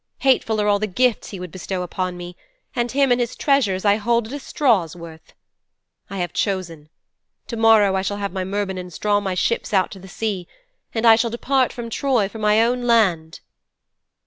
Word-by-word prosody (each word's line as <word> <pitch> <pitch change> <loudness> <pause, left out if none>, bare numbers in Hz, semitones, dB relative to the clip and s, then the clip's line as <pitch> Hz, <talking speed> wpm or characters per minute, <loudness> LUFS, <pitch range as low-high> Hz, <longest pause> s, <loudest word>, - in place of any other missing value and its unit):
Hateful 245 -5 +2
are 210 - +1
all 205 -1 +3
the 215 - -1
gifts 245 +4 0
he 195 - -7
would 180 -2 -7
bestow 185 0 -4
upon 180 0 -3
me, 175 0 -8 0.4
and 240 -1 -1
him 275 -1 +2
and 245 0 +3
his 235 - -2
treasures 215 -10 +1
I 205 0 +4
hold 235 +1 +1
at 230 - -9
a 290 - -4
straw's 215 - +1
worth. 160 -2 -12 0.8
I 195 - -6
have 175 -2 -3
chosen. 170 -7 -3 0.6
To 235 - -6
morrow 220 -3 +5
I 190 - +1
shall 205 +1 -3
have 200 -2 -4
my 190 -1 -2
Myrmidons 190 -3 -4
draw 205 -1 +2
my 190 -2 -3
ships 215 +2 -1
out 190 - +2
to 195 - -9
the 190 - -12
sea, 190 -3 -4 0.4
and 225 0 -1
I 225 -1 +8
shall 230 +1 0
depart 255 +2 +1
from 235 -1 -7
Troy 245 -4 +1
for 220 +3 -10
my 215 +1 +4
own 245 +1 0
land."' 180 -9 +2
205 Hz, 200 wpm, -21 LUFS, 185-235 Hz, 0.8 s, I